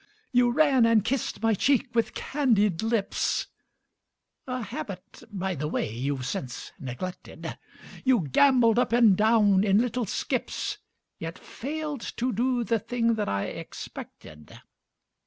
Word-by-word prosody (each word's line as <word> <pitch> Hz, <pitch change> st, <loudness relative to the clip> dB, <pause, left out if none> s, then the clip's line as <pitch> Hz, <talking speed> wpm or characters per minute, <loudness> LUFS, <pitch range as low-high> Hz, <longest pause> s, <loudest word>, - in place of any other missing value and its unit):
You 245 Hz, -1 st, +4 dB
ran 265 Hz, -2 st, +4 dB
and 220 Hz, -3 st, +3 dB
kissed 255 Hz, -3 st, -2 dB
my 225 Hz, 0 st, +4 dB
cheek 255 Hz, +3 st, +1 dB
with 230 Hz, -1 st, 0 dB
candied 210 Hz, -, +1 dB
lips, 225 Hz, -3 st, 0 dB, 1.0 s
A 255 Hz, -1 st, -3 dB
habit, 190 Hz, -3 st, -7 dB
by 190 Hz, -1 st, -2 dB
the 150 Hz, -1 st, -3 dB
way, 110 Hz, -7 st, -2 dB
you've 130 Hz, +2 st, -2 dB
since 125 Hz, -1 st, -5 dB
neglected; 135 Hz, +8 st, -6 dB, 0.5 s
You 255 Hz, -5 st, +4 dB
gambolled 235 Hz, -, +4 dB
up 245 Hz, -, +1 dB
and 230 Hz, -5 st, +6 dB
down 210 Hz, -2 st, +4 dB
in 200 Hz, -1 st, +4 dB
little 240 Hz, 0 st, 0 dB
skips, 410 Hz, -, -2 dB, 0.4 s
Yet -, -, -5 dB
failed 300 Hz, 0 st, -5 dB, 0.2 s
to 250 Hz, +1 st, 0 dB
do 245 Hz, +3 st, +1 dB
the 230 Hz, 0 st, +1 dB
thing 230 Hz, +2 st, 0 dB
that 215 Hz, -2 st, -1 dB
I 100 Hz, 0 st, 0 dB
expected. 75 Hz, -1 st, -9 dB
225 Hz, 135 wpm, -27 LUFS, 190-250 Hz, 1.0 s, and